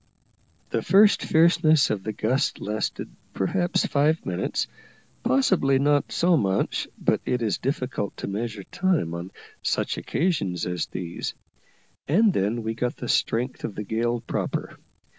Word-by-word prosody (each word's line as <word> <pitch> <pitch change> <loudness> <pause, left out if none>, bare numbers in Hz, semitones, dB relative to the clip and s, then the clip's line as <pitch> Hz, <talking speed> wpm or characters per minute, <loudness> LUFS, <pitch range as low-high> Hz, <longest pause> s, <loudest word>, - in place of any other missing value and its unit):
The - - 0
first 205 +2 +5
fierceness 160 -2 +4
of 105 -3 -1
the 110 - -3
gust 125 +7 0
lasted 105 +1 -3 0.3
perhaps 175 - +1
five 150 +3 +1
minutes, 90 0 -1 0.6
possibly 135 +1 +3
not 145 +1 +2
so 175 +1 +3
much, 95 -9 0
but - - +1
it 125 -1 -1
is 110 - 0
difficult 130 -5 -3
to - - -5
measure 105 0 -4
time 175 - 0
on 85 +2 -5 0.3
such - - -1
occasions 115 - -1
as 90 0 -2
these, 85 -2 -5 0.7
and 205 +7 +4
then 110 +4 0
we 110 0 -2
got 120 +2 -2
the - - -6
strength 125 +3 0
of 105 - -4
the 105 - -4
gale 115 +3 -1
proper. 115 - -3
120 Hz, 140 wpm, -25 LUFS, 105-155 Hz, 0.7 s, first